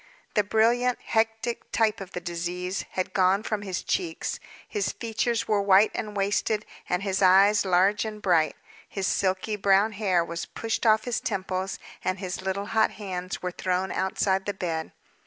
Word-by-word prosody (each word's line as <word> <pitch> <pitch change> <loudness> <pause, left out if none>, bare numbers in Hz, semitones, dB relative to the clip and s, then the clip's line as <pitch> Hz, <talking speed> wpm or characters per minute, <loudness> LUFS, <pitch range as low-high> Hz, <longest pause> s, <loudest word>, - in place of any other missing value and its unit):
The 210 - +3
brilliant 235 +4 +2
hectic, 225 +1 -1
type 220 -2 +1
of 195 -1 -9
the - - -3
disease, 175 +2 -3
had 185 - -2
gone 190 +2 +3
from 215 -2 -2
his 190 -3 -4
cheeks, 345 -4 -2 0.3
his 415 -2 -1
features 230 0 -1
were 210 -2 +2
white 200 +1 +5
and 210 -1 -4
wasted, 205 +2 0 0.2
and 180 +2 0
his 195 -1 -1
eyes 195 +3 +6
large 190 +3 +3
and 215 -1 -5
bright. 170 -6 +2 0.3
His 195 -1 -3
silky 190 +3 0
brown 200 +1 +3
hair 190 -5 +1
was 170 0 -5
pushed 225 +1 -2
off 215 0 +5
his 245 -2 -1
temples, 190 -2 -3 0.3
and 185 0 0
his 185 -1 -5
little 190 +1 -2
hot 220 -1 +4
hands 185 -3 -5
were 180 - -1
thrown 185 +1 -1
outside 190 0 0
the 205 - -2
bed. 165 -4 -3
195 Hz, 170 wpm, -26 LUFS, 185-215 Hz, 0.3 s, eyes